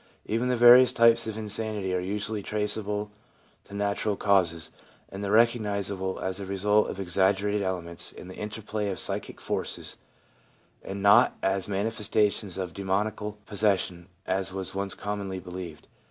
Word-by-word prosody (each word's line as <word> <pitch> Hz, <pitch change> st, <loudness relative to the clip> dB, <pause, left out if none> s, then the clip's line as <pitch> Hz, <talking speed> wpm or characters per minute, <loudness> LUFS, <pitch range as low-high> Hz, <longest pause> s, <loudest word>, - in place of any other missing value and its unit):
Even 115 Hz, +3 st, 0 dB
the 125 Hz, -, +2 dB
various 120 Hz, +1 st, +8 dB
types 115 Hz, 0 st, +4 dB
of 110 Hz, -1 st, -4 dB
insanity 105 Hz, -3 st, -3 dB
are 90 Hz, -, +1 dB
usually 105 Hz, +3 st, -3 dB
traceable 105 Hz, 0 st, -2 dB, 0.5 s
to 100 Hz, -, -11 dB
natural 100 Hz, +1 st, 0 dB
causes, 90 Hz, -6 st, +1 dB, 0.4 s
and 100 Hz, +1 st, -7 dB
recognisable 100 Hz, -4 st, +1 dB
as 95 Hz, 0 st, -3 dB
the 100 Hz, -, -5 dB
result 105 Hz, +2 st, +2 dB
of -, -, -6 dB
exaggerated 100 Hz, +2 st, +1 dB
elements 85 Hz, -3 st, -3 dB
in -, -, -11 dB
the 95 Hz, -, -9 dB
interplay 105 Hz, 0 st, -4 dB
of 95 Hz, -, -3 dB
psychic -, -, -4 dB
forces, -, -, -3 dB, 0.8 s
and 100 Hz, 0 st, -6 dB
not 100 Hz, 0 st, +6 dB
as 95 Hz, 0 st, +1 dB
manifestations 105 Hz, -1 st, 0 dB
of 90 Hz, -3 st, -4 dB
demoniacal 105 Hz, +2 st, -1 dB
possession, 95 Hz, -4 st, 0 dB, 0.2 s
as 95 Hz, 0 st, -1 dB
was 95 Hz, -1 st, -4 dB
once 100 Hz, 0 st, -3 dB
commonly 100 Hz, -2 st, -4 dB
believed. 90 Hz, -3 st, -8 dB
100 Hz, 140 wpm, -27 LUFS, 95-105 Hz, 0.8 s, various